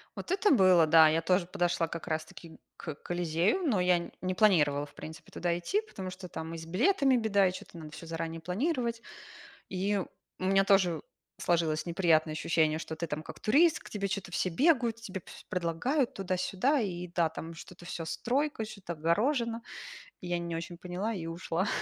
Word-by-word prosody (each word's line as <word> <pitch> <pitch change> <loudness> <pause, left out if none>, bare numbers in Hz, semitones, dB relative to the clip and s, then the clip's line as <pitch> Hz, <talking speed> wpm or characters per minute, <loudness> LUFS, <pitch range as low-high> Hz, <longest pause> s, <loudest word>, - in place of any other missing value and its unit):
Вот - - -6
это 385 +2 +3
было, 185 - +6
да, 160 0 +8
я 160 +1 +2
тоже 180 +1 +2
подошла 175 -2 0
как 170 +1 -6
раз 155 -1 -1
таки 160 +1 -13 0.2
к 155 -4 -6
Колизею, 175 - 0
но 205 -8 +2
я 180 -1 +2
не 185 0 -1
планировала, 150 -8 +3
в - - -18
принципе, 160 +1 -10
туда 170 -1 -1
идти, 405 - 0
потому 190 - -7
что 185 0 -9
там 160 0 -6
и - - -5
с 160 - -8
билетами 265 - +3
беда, 200 -4 +3
и - - -3
что-то 180 - -10
надо 155 -2 -9
всё 160 - -9
заранее 165 0 -4
планировать. 235 - -1 0.7
И 195 +2 0
у 185 - -9
меня 195 +1 +4
тоже 185 -5 +3 0.3
сложилось 165 -3 +1
неприятное 165 -3 +2
ощущение, 155 0 +1
что 160 0 -6
ты 170 +1 -3
там 150 0 -4
как - - -10
турист, 310 +9 +4
к - - -13
тебе 200 -2 -2
что-то 190 -2 -4
все 185 - 0
бегают, 240 - +3
тебе 195 -5 -7
всё - - -12
предлагают 185 - 0
туда-сюда, 190 +9 0
и, 180 -4 -3
да, 170 -1 +1
там 160 +1 -7
что-то 175 +1 -12
всё 165 -1 -5
стройка, 265 - -1
что-то 200 -5 -7
огорожено. 230 - +1 0.6
Я 175 -1 -2
не 170 -1 -4
очень 170 +1 -6
поняла 185 +5 -3
и 170 -5 -5
ушла 170 +2 -2
180 Hz, 185 wpm, -30 LUFS, 165-210 Hz, 0.7 s, да